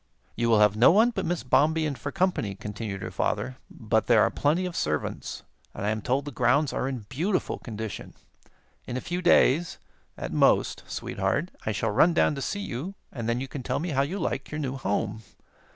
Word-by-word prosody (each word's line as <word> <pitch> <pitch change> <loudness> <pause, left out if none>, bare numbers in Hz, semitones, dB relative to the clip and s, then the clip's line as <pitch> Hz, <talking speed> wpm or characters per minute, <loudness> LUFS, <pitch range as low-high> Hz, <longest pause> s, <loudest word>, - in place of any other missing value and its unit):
"You 120 0 0
will 110 -2 +5
have 105 -1 +5
no 115 +3 +7
one 220 +6 +5
but 195 -6 -3
Miss 175 0 -1
Bombien 155 +3 +2
for 145 +1 -5
company," 180 - 0
continued 105 -1 -5
her - - -5
father; 130 0 -1
"but 110 0 -1
there 115 -3 +6
are - - +2
plenty 160 +6 +1
of 180 -1 -5
servants, 75 0 -3 0.3
and - - -4
I 105 - +2
am 110 0 -2
told 130 +6 0
the 145 - -5
grounds 130 +4 +2
are 130 - -1
in 130 -6 -4
beautiful 175 - -1
condition. 110 -3 -7 0.7
In 125 - -3
a - - -1
few 175 +6 -3
days, 175 -2 +4 0.4
at - - -5
most, - - +3
Sweetheart, 170 +6 -2 0.2
I - - +2
shall 105 - -1
run 165 +11 +4
down - - +3
to 140 - -5
see 200 +9 -2
you, 175 +3 -5 0.2
and 115 -3 -4
then 120 +1 +1
you 135 - -4
can 135 +1 -6
tell - - -2
me 170 +5 -3
how 135 -3 +1
you 155 +8 -2
like 150 -6 -2
your 150 - -5
new 135 -3 -2
home. 110 -2 -2
135 Hz, 210 wpm, -27 LUFS, 110-165 Hz, 0.7 s, no